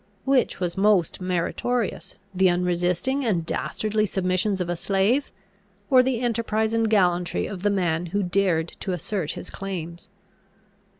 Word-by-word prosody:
Which 270 -2 +2
was 180 -1 -2
most 195 -4 +2
meritorious, 185 +6 -2 0.2
the 190 0 +4
unresisting 180 +9 0
and 185 -9 0
dastardly 215 +4 -1
submission 185 +2 0
of 180 - -1
a 175 - -1
slave, 200 - +1 0.6
or 255 -1 +8
the 255 -2 -1
enterprise 225 -2 0
and 225 -1 +2
gallantry 180 -4 +2
of 190 -3 -6
the 205 - +2
man 175 -4 0
who 200 +4 -1
dared 175 -3 +1
to 190 - -3
assert 180 -1 -3
his - - -8
claims? 175 -1 -6
190 Hz, 140 wpm, -24 LUFS, 175-220 Hz, 0.6 s, or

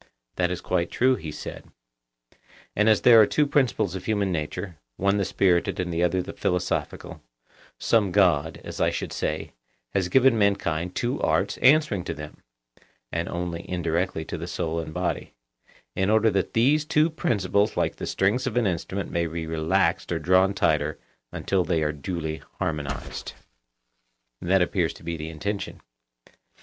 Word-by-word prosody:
That 90 -1 +1
is 90 - -3
quite 90 -2 0
true, 130 +1 +3
he 80 -9 -6
said. 75 - -8 1.1
And 105 +2 +4
as 110 - +4
there 115 -2 +8
are 105 - +5
two 150 - +2
principles 130 - +1
of 95 - -6
human 100 -3 0
nature, 85 +2 -4 0.2
one 100 +1 +2
the 100 - +1
spirited 90 -2 +1
and 90 -2 -2
the 85 - 0
other 90 +1 +1
the - - -7
philosophical, 90 -1 -2 0.6
some 105 -5 +2
God, 85 -5 +2
as - - -6
I - - +4
should - - -4
say, 75 +1 -3 0.4
has 95 -2 0
given 130 -2 +4
mankind 90 -4 0
two 125 +3 -1
arts 100 +1 +1
answering 135 - +4
to - - -4
them 75 0 -9 0.7
(and 85 +1 -2
only 85 -1 -4
indirectly 85 -1 -1
to - - -5
the - - -5
soul 85 -1 -2
and 80 -1 -5
body), - - -3 0.6
in 95 +1 +1
order 110 0 +4
that 95 -1 -1
these 140 +7 +4
two 155 +1 +2
principles 105 - 0
(like - - 0
the - - -5
strings 110 +7 +1
of 125 - -2
an 120 - +3
instrument) 95 +1 -2
may 85 0 0
be 80 0 -4
relaxed 80 0 0
or - - +1
drawn 95 +2 +3
tighter 75 -4 +1 0.3
until 95 -2 0
they 85 -3 0
are 75 - +1
duly 80 +1 -4 0.2
harmonized. 70 -4 -4 1.1
That 95 +1 +3
appears 90 -2 0
to - - -15
be 85 0 -3
the 80 0 -6
intention. 100 +6 -4
90 Hz, 165 wpm, -25 LUFS, 85-105 Hz, 1.1 s, there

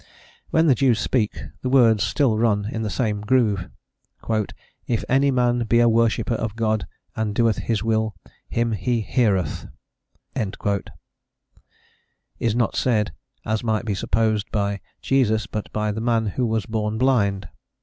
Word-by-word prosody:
When 160 +1 +3
the 145 - +6
Jews 125 -3 +2
speak, 120 -3 0 0.2
the 130 - -2
words 115 -5 +5
still 130 -5 +2
run 105 -3 +2
in 110 - -3
the 110 - -2
same 105 -3 -1
groove: 105 -5 +1 1.2
"If 115 -3 0
any 135 +2 +3
man 120 -2 +2
be 115 +2 +3
a 120 - +5
worshipper 115 0 +2
of 110 -1 -3
God, 110 -2 0 0.3
and 110 -2 -2
doeth 115 -2 +2
His 110 -2 -1
will, 110 -1 0 0.3
him 115 0 0
He 115 +2 0
heareth," 105 -5 0 2.7
is 115 -2 0
not 120 -4 +1
said, 105 -7 +1 0.3
as 110 +1 -1
might 110 -1 0
be 105 - -1
supposed, 110 +2 0
by 100 -2 -1 0.2
Jesus, 115 -5 +2
but 105 - -5
by 105 0 -1
the 110 +2 -4
man 115 -1 +1
who 120 +4 -1
was 110 -2 -1
born 110 -1 -2
blind. 105 -6 +1
110 Hz, 150 wpm, -23 LUFS, 105-120 Hz, 2.7 s, the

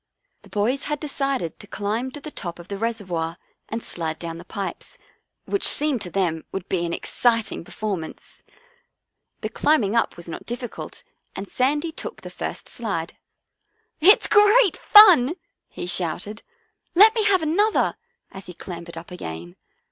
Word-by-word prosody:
The - - -17
boys 235 +7 -1
had 295 -1 -2
decided 275 - -2
to 205 - -11
climb 220 +6 -2
to 275 - -8
the 305 +1 -8
top 170 -9 -6
of 175 +1 -13
the 200 - -4
reservoir 185 -8 -3 0.3
and 225 +1 -4
slide 160 -2 -3
down 165 0 -6
the - - -10
pipes, 195 +1 -6 0.5
which 400 - 0
seemed 290 -6 +4
to 180 - -4
them 170 -4 -1
would 195 -2 -5
be 175 -2 -1
an - - -4
exciting 230 +3 0
per - - -15
formance. 195 -7 -6 1.0
The - - -3
climbing 240 -9 +2
up 230 - +1
was 170 - -10
not 165 - -8
difficult 240 0 -6 0.3
and 195 - -6
Sandy 295 +8 0
took - - -8
the - - -9
first - - -6
slide. - - -4 0.4
" - - -46
It's - - +4
great 415 -2 +5
fun," 360 - +7 0.3
he - - -7
shouted. 180 +4 -1 0.3
" 435 -5 -48
Let 425 +5 +8
me 445 - +1
have 380 -5 +4
another! 405 +8 +2 0.2
" 480 - -47
as 195 0 -11
he 180 - -9
clambered 170 -1 -8
up 165 +2 -9
again. 85 - -7
215 Hz, 170 wpm, -23 LUFS, -, 1.0 s, Let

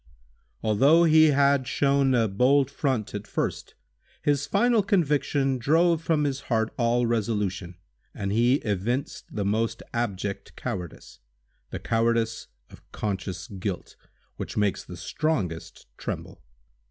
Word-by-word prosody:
Although 135 +10 +5
he 160 -1 +6
had 140 -3 +3
shown 140 -2 +2
a 115 -2 +3
bold 130 +7 +3
front 130 -7 -1
at 105 0 -5
first, - - -3 0.5
his 145 -1 +1
final 230 +2 +3
conviction 145 -8 +1
drove 165 +5 +3
from 160 -2 +1
his 140 -2 -1
heart 110 -2 +1
all 120 0 +2
resolution, 105 -6 -1 0.4
and 100 -1 -4
he 120 +4 +3
evinced 110 +7 -2
the 100 -2 -3
most 110 +3 -1
abject 100 -4 -3
cowardice—the - - -8
cowardice 115 0 0 0.2
of - - -14
conscious 95 -3 -4
guilt, 95 -1 -5 0.4
which - - -6
makes 105 -2 +1
the - - -10
strongest 100 - -3
tremble. - - -6
120 Hz, 120 wpm, -26 LUFS, 100-140 Hz, 0.5 s, he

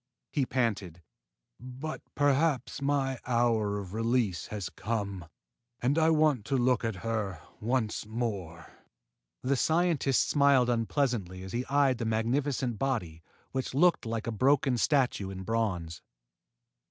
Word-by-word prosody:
he 140 -4 0
panted. 100 -9 -1 0.6
"But 130 +5 -6
perhaps 145 -2 +1
my 135 -2 0
hour 115 -4 +2
of 95 -2 -7
release 115 -5 0
has 105 -4 -4
come, 100 -4 -3 0.5
and 130 +4 +1
I 160 0 +4
want 155 -7 +3
to 135 - 0
look 125 -2 +2
at 110 -5 -3
her 105 -6 -2 0.2
once 110 -2 -1
more." 100 -8 -4 0.7
The 135 +2 +2
scientist 160 -1 +2
smiled 140 -4 +4
unpleasantly 115 -5 -1
as 95 - -8
he 120 +2 -2
eyed 135 -3 +2
the 115 - -2
magnificent 120 +2 0
body 105 -13 -2 0.3
which 130 0 -3
looked 170 -4 +3
like 115 -1 -3
a 115 - -2
broken 130 +3 +3
statue 125 -8 +1
in 95 -1 -6
bronze. 95 -7 -2
120 Hz, 130 wpm, -29 LUFS, 105-135 Hz, 0.7 s, I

